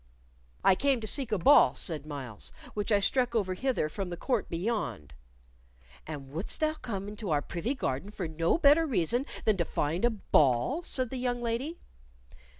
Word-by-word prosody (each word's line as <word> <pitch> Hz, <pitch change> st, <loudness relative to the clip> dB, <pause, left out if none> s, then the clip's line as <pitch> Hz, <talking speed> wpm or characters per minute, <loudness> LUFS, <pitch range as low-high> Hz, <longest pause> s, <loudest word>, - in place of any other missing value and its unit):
"I -, -, +6 dB
came 275 Hz, +5 st, +2 dB
to -, -, -4 dB
seek 260 Hz, +3 st, 0 dB
a 210 Hz, -, +2 dB
ball," 275 Hz, +12 st, +6 dB
said 155 Hz, -4 st, 0 dB
Myles, 130 Hz, -8 st, -6 dB, 0.2 s
"which 205 Hz, +1 st, -2 dB
I 205 Hz, -, +6 dB
struck 245 Hz, +4 st, +1 dB
over 195 Hz, -4 st, +1 dB
hither 255 Hz, -, 0 dB
from 190 Hz, +4 st, -5 dB
the 175 Hz, -, -5 dB
court 245 Hz, -1 st, -1 dB
beyond." 165 Hz, -, -3 dB, 0.9 s
"And 140 Hz, -4 st, -7 dB
wouldst 165 Hz, +8 st, -4 dB
thou 310 Hz, 0 st, +1 dB
come 205 Hz, -10 st, -5 dB
into 210 Hz, -1 st, -6 dB
our 145 Hz, -2 st, +1 dB
privy 220 Hz, +11 st, -3 dB
garden 140 Hz, -, -3 dB
for 195 Hz, -4 st, -4 dB
no 165 Hz, -, +1 dB
better 320 Hz, +1 st, +5 dB
reason 245 Hz, -, +1 dB, 0.2 s
than 215 Hz, -3 st, +3 dB
to 170 Hz, -, +1 dB
find 160 Hz, +3 st, -2 dB
a 240 Hz, -, +5 dB
ball?" 175 Hz, -, +2 dB
said 255 Hz, -8 st, -2 dB
the 265 Hz, -, -3 dB
young 245 Hz, -1 st, -1 dB
lady. 240 Hz, +8 st, -2 dB
205 Hz, 180 wpm, -29 LUFS, 165-250 Hz, 0.9 s, I